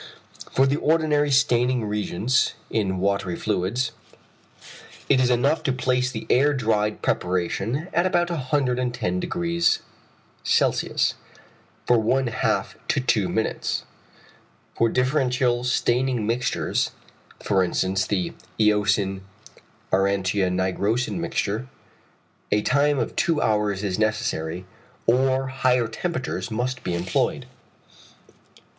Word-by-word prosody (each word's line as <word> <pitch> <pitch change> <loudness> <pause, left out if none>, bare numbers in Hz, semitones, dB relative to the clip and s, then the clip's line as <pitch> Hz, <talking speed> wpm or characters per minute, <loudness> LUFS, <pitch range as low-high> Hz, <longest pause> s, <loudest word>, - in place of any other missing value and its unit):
For 135 - +3
the 140 +2 +1
ordinary 150 -2 +2
staining 125 -3 +2
reagents 105 +4 0 0.2
(in 95 -4 0
watery 100 -1 0
fluids) 110 +12 -1 1.2
it 130 - +4
is 125 -1 +3
enough 135 +6 +2
to 150 -4 0
place 125 0 0
the 115 -4 -6
air 145 +3 +3
dried 110 -4 0
preparation 95 - -1
at 175 +2 +3
about 175 -2 +1
110° 130 - 0 0.6
C. - - +1 0.9
for 120 -1 +4
one 130 +5 +1
half 115 -2 -1
to - - +1
two - - +1
minutes. - - -1 0.9
For 115 - +2
differential 125 -1 +1
staining 125 -1 +1
mixtures, 120 +3 0 0.5
for 95 -2 +2
instance 95 +2 0
the 95 -4 -1 0.3
eosin 105 -2 +2 0.7
aurantia 95 0 +2
nigrosin 100 +4 0
mixture, 105 +8 -2 0.8
a 105 0 +2
time 145 +1 +2
of 120 - -2
two 165 -3 +1
hours 105 -4 0
is 95 -2 -2
necessary, 90 -5 -1 0.4
or 130 +2 +2
higher 125 -2 +1
temperatures 115 - -3
must 125 +3 -3
be 90 - -2
employed. 90 +1 -1
120 Hz, 105 wpm, -24 LUFS, 100-130 Hz, 1.2 s, it